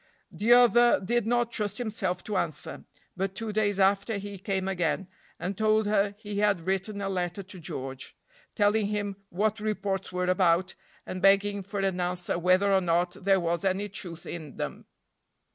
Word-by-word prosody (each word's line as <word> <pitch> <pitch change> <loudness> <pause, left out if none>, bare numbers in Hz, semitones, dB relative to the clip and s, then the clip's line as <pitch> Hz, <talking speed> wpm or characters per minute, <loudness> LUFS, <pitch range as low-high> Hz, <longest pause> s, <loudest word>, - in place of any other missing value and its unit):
The 225 +3 0
other 240 0 +6
did 230 +3 0
not 240 0 +1
trust 210 -2 -2
himself 200 -6 -2
to 210 - -4
answer. 155 -4 -3 0.3
But 195 +1 -2
two 225 -1 -3
days 205 -2 +1
after 200 +3 +2
he 200 -1 -7
came 190 -1 -2
again, 180 0 -1 0.3
and 190 +2 -3
told 215 +1 +2
her 205 -1 +1
he 205 -1 -5
had 200 -5 +2
written 195 +2 -1
a 195 - -2
letter 180 0 -2
to 190 0 -10
George, 135 -4 -6 0.4
telling 210 0 +3
him 205 -1 -2
what 210 +4 0
reports 195 -3 -2
were 180 0 -1
about, 180 -1 +2 0.3
and 185 - -5
begging 200 +1 +4
for 200 +1 -5
an 190 -2 0
answer 180 -1 -1
whether 185 +3 +3
or 190 - +4
not 175 0 +1
there 195 0 +4
was 170 +1 -1
any 195 +2 0
truth 175 -4 -7
in 155 -5 -7
them. - - -5
195 Hz, 175 wpm, -28 LUFS, 180-210 Hz, 0.4 s, other